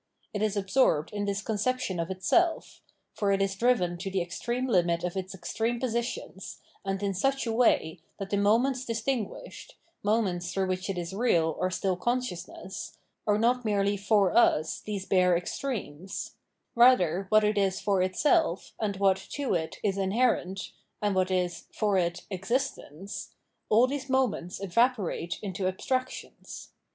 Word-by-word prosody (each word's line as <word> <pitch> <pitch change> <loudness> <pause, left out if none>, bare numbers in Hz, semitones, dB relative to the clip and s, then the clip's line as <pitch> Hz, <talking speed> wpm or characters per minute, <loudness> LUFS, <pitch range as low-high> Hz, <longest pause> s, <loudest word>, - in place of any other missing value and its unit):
It 205 - -2
is 215 -1 0
absorbed 195 - +2
in 205 0 -2
this 200 0 -2
conception 220 -3 -1
of 165 +1 -2
itself; 325 - +1 0.3
for 205 -2 0
it 195 - +2
is 195 0 +1
driven 190 -6 +1
to 195 +2 -4
the 190 0 0
extreme 240 +8 -3
limit 175 -7 +2
of 180 0 -2
its 190 0 -4
extreme 225 +6 -2
positions, 235 -6 -4 0.2
and 195 0 -2
in 200 -1 0
such 270 +9 0
a 230 - -1
way 205 -8 +2 0.2
that 195 -1 -6
the 200 - +2
moments 240 +6 +2
distinguished, 230 -1 -4 0.3
moments 195 -5 0
through 190 -1 -1
which 185 +1 -2
it 195 - -2
is 175 +1 -4
real 170 -8 +2
or 185 - +1
stiU 185 0 -1
consciousness, 240 -5 -4 0.3
are 210 0 +4
not 245 +3 +2
merely 205 -2 +1
for 200 -2 +2
us 155 -9 +3
these 200 -3 -5
bare 180 -2 +4
ex 175 - -5
tremes; 195 - -4 0.4
rather 195 -7 +4
what 215 0 +5
it 210 0 +2
is 195 -1 +1
for 195 -2 +1
itself, 300 - +1
and 205 -3 -1
what, 195 -1 +3 0.2
to 285 -6 -1
it, 160 -2 -2
is 200 -2 0
inherent, 195 -2 0 0.3
and 205 -1 0
what 185 0 +1
is, 180 -2 -1
for 210 -2 0
it, 175 -2 0
existence 195 - -3 0.2
— - - -50
all 225 +4 +6
these 270 0 -4
moments 250 -9 0
evaporate 195 -4 0
into 190 -1 -2
abstractions. 255 +7 -4
200 Hz, 160 wpm, -28 LUFS, 185-235 Hz, 0.4 s, all